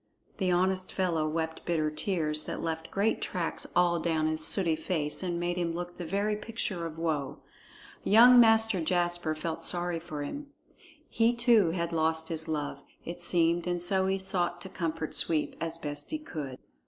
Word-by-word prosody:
The 190 -2 +1
honest 185 +1 +1
fellow 170 -5 0
wept 160 0 -3
bitter 155 -3 0
tears 155 -2 0
that - - -5
left 160 0 -4
great 205 +3 0
tracks 175 -3 -2
all 175 -1 +3
down 160 -1 0
his 155 0 0
sooty 170 -3 +2
face 155 -2 -2
and 175 -2 -2
made 175 +1 -2
him 170 -2 -1
look 175 0 -6
the 175 - -6
very 200 +4 0
picture 210 -5 -3
of 160 -1 -10
woe. 155 -4 -2 0.7
Young 245 +4 +7
Master 225 -4 +5
Jasper 175 -1 0
felt 160 +1 -4
sorry 175 0 0
for 155 -3 -6
him. 290 - -6 0.6
He 230 +1 +2
too 235 -6 +4
had 170 0 -2
lost 160 0 0
his 160 -1 -2
love, 145 -3 -3 0.2
it 175 +1 -6
seemed, 170 0 +2
and 175 0 -1
so 190 +2 +1
he 190 0 +1
sought 175 -2 0
to 190 - -8
comfort 165 -4 -4
Sweep 155 -2 +2
as 165 0 -1
best 145 -3 -4
he 310 - -2
could. 150 - -7
170 Hz, 180 wpm, -29 LUFS, 160-185 Hz, 0.7 s, Young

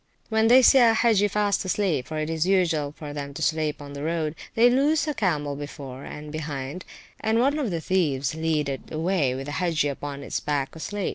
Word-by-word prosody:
When 220 0 +3
they 255 +3 +7
see 270 - +7
an 230 -2 +5
Hagge 220 -3 +3
fast 205 0 +1
asleep 185 -8 0
(for 155 - -5
it 155 0 -1
is 160 +1 -1
usual 165 -7 +2
for 150 -2 -7
them 140 -1 -6
to - - -6
sleep 155 -1 0
on 145 -1 -9
the 140 - -6
road), 160 -1 -1 0.2
they 230 +2 +6
loose 285 +6 +2
a 300 - 0
camel 150 - -1
before 140 -2 -8
and 150 0 -8
behind, 150 +1 -5 0.3
and 220 +1 +1
one 280 +5 +2
of 265 -7 -1
the 170 -3 -2
thieves 150 -7 0
leads 160 -2 0
it 135 - -7
away 160 -5 0
with 135 +1 -5
the 145 - -5
Hagge 165 -2 0
upon 140 0 -4
its - - -3
back 145 -1 -2
asleep. 200 +4 -3
160 Hz, 215 wpm, -25 LUFS, 145-205 Hz, 0.3 s, they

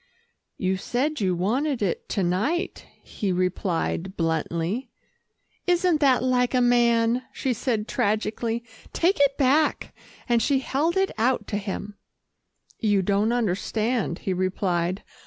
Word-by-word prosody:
"You 190 0 0
said 260 +8 -1
you 185 -2 +1
wanted 245 - 0
it 190 - -2
to 195 - 0
night," 215 - -1 0.2
he 200 -3 -3
replied 185 0 -1
bluntly. 165 - -1 0.8
"Isn't 355 -2 +3
that 265 -4 +4
like 250 0 +2
a - - +4
man," 240 0 +3
she 260 - -1
said 225 -2 -1
tragically. 225 +2 -1 0.3
"Take 360 +2 +2
it 280 -1 +3
back," 290 +3 +2 0.3
and 240 -2 +3
she 280 +2 +2
held 290 +6 0
it 385 0 +2
out 250 +3 +1
to 205 - -1
him. 205 0 -5 0.8
"You 205 -3 +2
don't 200 +4 +2
understand," 220 -2 0
he 190 - +1
replied. 185 -1 -1
225 Hz, 130 wpm, -25 LUFS, 190-260 Hz, 0.8 s, that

